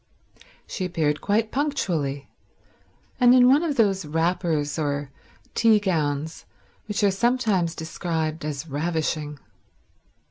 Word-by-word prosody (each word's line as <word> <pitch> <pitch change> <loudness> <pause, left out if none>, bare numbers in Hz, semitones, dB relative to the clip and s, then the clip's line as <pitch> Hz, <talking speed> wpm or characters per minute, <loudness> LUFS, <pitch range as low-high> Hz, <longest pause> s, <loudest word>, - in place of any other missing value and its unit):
She 190 - -5
appeared 155 -5 0
quite 215 +2 0
punctually, 165 - -1 0.9
and 245 0 +6
in 250 -1 +7
one 275 +4 +5
of 320 -4 -1
those 195 -5 +2
wrappers 160 -1 -1
or 145 -2 -2 0.4
tea 225 -2 +4
gowns 160 -5 -2 0.4
which 210 0 -2
are 200 - +5
sometimes 200 -6 +1
described 160 -1 -3
as 150 +1 -4
ravishing. 155 0 -2
170 Hz, 110 wpm, -24 LUFS, 150-210 Hz, 0.9 s, in